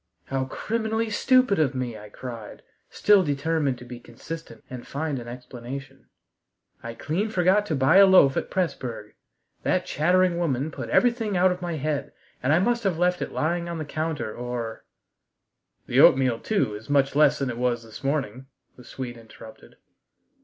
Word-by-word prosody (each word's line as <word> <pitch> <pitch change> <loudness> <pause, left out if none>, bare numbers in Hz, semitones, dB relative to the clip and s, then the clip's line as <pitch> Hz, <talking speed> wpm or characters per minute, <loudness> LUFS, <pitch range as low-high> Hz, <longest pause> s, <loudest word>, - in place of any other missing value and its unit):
"How 135 -1 -2
criminally 220 - -2
stupid 255 -3 +3
of 140 -4 +1
me!" 125 -3 -3
I 105 0 -11
cried, 115 -1 -9 0.3
still 205 -2 +4
determined 145 -2 0
to 125 - -12
be 120 0 -9
consistent 160 +8 -9
and 125 -1 -9
find 145 -1 -3
an 120 - -9
explanation. 125 +2 -9 0.7
"I 115 0 -7
clean 180 - -2
forgot 190 +1 +2
to 155 - -1
buy 135 +7 +4
a 195 0 +8
loaf 185 -8 +6
at - - -2
Pressburg. 125 - -3 0.5
That - - 0
chattering 180 +2 +2
woman 150 -3 -1
put - - -7
everything 230 -5 +2
out 185 +1 +4
of 180 0 -4
my 175 -1 -3
head, 145 -1 -3 0.3
and 130 - +1
I 155 - +5
must 235 +6 +1
have 190 -5 0
left 180 +1 +1
it - - -3
lying 170 +2 -1
on 170 - -4
the 155 - -4
counter 155 -6 -3
or 120 -2 -5 0.5
" - - -53
"The - - +1
oatmeal, 130 -3 +5
too, 200 - 0
is 105 +4 -10
much 140 -1 +2
less 150 +1 +5
than 135 -2 -2
it 120 - -7
was 120 -2 0
this 110 +4 -12
morning," 135 -3 -2 0.3
the 125 - -13
Swede 120 0 -7
interrupted. 110 -1 -14
145 Hz, 175 wpm, -25 LUFS, 125-180 Hz, 0.7 s, a